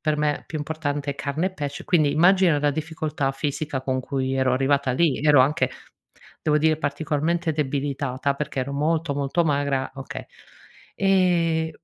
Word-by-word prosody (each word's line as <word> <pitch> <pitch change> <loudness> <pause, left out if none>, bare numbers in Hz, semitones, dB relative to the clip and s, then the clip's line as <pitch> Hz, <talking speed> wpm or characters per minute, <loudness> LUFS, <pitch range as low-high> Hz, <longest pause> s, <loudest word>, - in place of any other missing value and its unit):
per 155 -1 0
me 150 -1 -1
più 155 - -5
importante 145 -1 -3
è - - -4
carne 150 +6 -2
e - - -1
pesce, 145 -3 -5
quindi 155 -5 +3
immagina 175 0 +4
la 145 - +2
difficoltà 155 -1 -2
fisica 145 0 -3
con 130 -1 -1
cui 130 0 -2
ero 130 -1 +2
arrivata 135 0 +1
lì, 150 -1 +2
ero 150 -3 +6
anche 145 +4 +2 0.7
devo 150 -1 +2
dire 155 +1 +3
particolarmente 160 +3 -1
debilitata 140 -2 -1
perché 140 -2 -3
ero 140 +2 -3
molto, 155 +1 0
molto 145 +5 0
magra, 140 -3 0
okay 135 -1 -7 0.7
ehm, 175 -4 +2
145 Hz, 155 wpm, -24 LUFS, 140-160 Hz, 0.7 s, ero